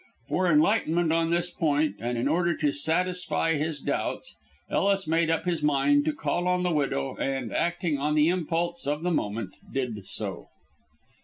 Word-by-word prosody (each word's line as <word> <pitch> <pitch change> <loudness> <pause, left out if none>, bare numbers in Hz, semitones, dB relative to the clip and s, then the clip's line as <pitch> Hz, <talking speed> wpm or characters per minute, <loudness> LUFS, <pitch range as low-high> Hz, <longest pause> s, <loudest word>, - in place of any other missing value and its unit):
For 185 - +1
enlightenment 165 0 +3
on 165 0 +1
this 175 +1 0
point, 155 -2 0
and 120 +1 -2
in 120 +3 0
order 170 +2 +1
to 145 - +1
satisfy 165 +3 +1
his 155 0 -2
doubts, - - -3 0.3
Ellis 195 -1 +1
made 165 +1 +1
up 165 +1 0
his 170 -3 -1
mind 145 0 +3
to 155 - +2
call 165 +5 -1
on 180 0 +1
the 180 - +1
widow, 135 - -1
and, 135 -4 -2
acting 175 -3 0
on 150 +2 0
the 150 0 +4
impulse 170 -2 -1
of 150 +2 -1
the 180 - 0
moment, 105 - -2 0.2
did 115 -7 -3
so. - - -4
160 Hz, 170 wpm, -27 LUFS, 145-175 Hz, 0.3 s, the